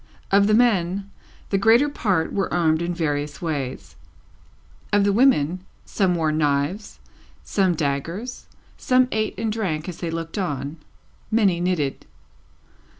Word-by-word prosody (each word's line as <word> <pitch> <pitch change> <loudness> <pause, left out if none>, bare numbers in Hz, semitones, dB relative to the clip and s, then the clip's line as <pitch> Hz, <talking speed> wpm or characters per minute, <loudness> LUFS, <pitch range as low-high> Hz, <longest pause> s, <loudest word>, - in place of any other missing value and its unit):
Of 200 +1 +5
the 215 - +4
men, 200 -4 +1 0.4
the 195 - +2
greater 230 +7 +5
part 195 - -1
were 195 - -1
armed 160 -2 +2
in 170 +1 -1
various 145 -4 -2
ways; 130 - -4 1.0
of 205 0 +4
the 200 0 +2
women, 185 - +3 0.2
some 190 -4 +1
wore 160 -2 +1
knives, 150 +6 -1 0.5
some 190 -4 +1
daggers, 165 - -3 0.3
some 255 0 +3
ate 215 -2 -1
and 220 +1 -1
drank 185 -8 -2
as 180 -2 -7
they 170 - -3
looked 165 +4 -4
on, 145 -4 -3 0.5
many 200 -6 +2
knitted. 175 -6 -1
180 Hz, 135 wpm, -23 LUFS, 155-205 Hz, 1.0 s, Of